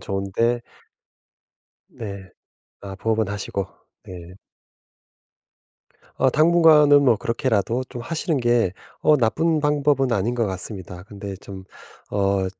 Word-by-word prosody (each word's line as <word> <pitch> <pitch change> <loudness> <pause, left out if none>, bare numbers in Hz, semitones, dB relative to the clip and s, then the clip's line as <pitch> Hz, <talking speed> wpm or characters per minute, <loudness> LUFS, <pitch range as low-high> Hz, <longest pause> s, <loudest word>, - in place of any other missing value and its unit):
좋은데 100 +5 -1 1.3
네. 100 -4 -8 0.5
아 100 -1 -8
부업은 110 +1 -1
하시고. 100 -1 -3 0.4
네. 90 -1 -11 1.8
어 130 - +3
당분간은 155 -2 +5
뭐 120 -4 +4
그렇게라도 115 +1 -1
좀 125 - -8
하시는 165 +2 -2
게 120 -6 +2 0.3
어 155 - +4
나쁜 155 +6 +1
방법은 145 -3 +1
아닌 115 +3 0
것 115 -2 0
같습니다. 95 -2 -6
근데 100 -1 -8
좀 95 0 -11 0.5
어 100 -1 0
115 Hz, 215 characters per minute, -22 LUFS, 100-140 Hz, 1.8 s, 당분간은